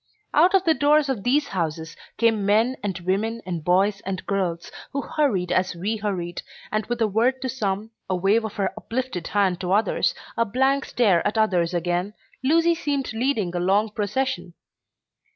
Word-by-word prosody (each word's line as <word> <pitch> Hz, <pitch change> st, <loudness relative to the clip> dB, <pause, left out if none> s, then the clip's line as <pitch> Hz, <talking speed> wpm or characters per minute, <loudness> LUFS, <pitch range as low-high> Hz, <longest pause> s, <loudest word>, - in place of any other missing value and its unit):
Out 355 Hz, +5 st, +5 dB
of 380 Hz, -, +4 dB
the 330 Hz, -3 st, +4 dB
doors 290 Hz, +1 st, +3 dB
of 250 Hz, -7 st, -1 dB
these 280 Hz, +5 st, +2 dB
houses 165 Hz, -3 st, -3 dB, 0.2 s
came 225 Hz, -3 st, +2 dB
men 220 Hz, +6 st, +3 dB
and 195 Hz, -4 st, -3 dB
women 205 Hz, +6 st, -1 dB
and 175 Hz, -4 st, -4 dB
boys 195 Hz, +4 st, +2 dB
and 190 Hz, -1 st, -4 dB
girls, 180 Hz, -4 st, -2 dB, 0.2 s
who 280 Hz, -, -2 dB
hurried 210 Hz, -, 0 dB
as 185 Hz, -1 st, +1 dB
we 205 Hz, +6 st, -2 dB
hurried, 185 Hz, -5 st, -3 dB, 0.3 s
and 215 Hz, -1 st, -1 dB
with 240 Hz, -1 st, -3 dB
a -, -, +3 dB
word 235 Hz, +6 st, +1 dB
to 260 Hz, -, -1 dB
some, 215 Hz, -3 st, -2 dB, 0.2 s
a 185 Hz, -, +1 dB
wave 195 Hz, +5 st, +2 dB
of 220 Hz, -2 st, -4 dB
her 195 Hz, -2 st, -1 dB
uplifted 250 Hz, -6 st, -4 dB
hand 190 Hz, -3 st, +1 dB
to 180 Hz, -1 st, -2 dB
others, 210 Hz, +3 st, +2 dB, 0.2 s
a 230 Hz, -, +3 dB
blank 265 Hz, +5 st, +1 dB
stare 200 Hz, -8 st, +3 dB
at 210 Hz, -, -2 dB
others 180 Hz, -5 st, +2 dB
again, 175 Hz, +4 st, -1 dB, 0.3 s
Lucy 330 Hz, +5 st, +4 dB
seemed 285 Hz, -7 st, -2 dB
leading 225 Hz, -7 st, -1 dB
a -, -, 0 dB
long 200 Hz, +4 st, +2 dB
procession. 205 Hz, -4 st, -2 dB
210 Hz, 180 wpm, -24 LUFS, 185-255 Hz, 0.3 s, Out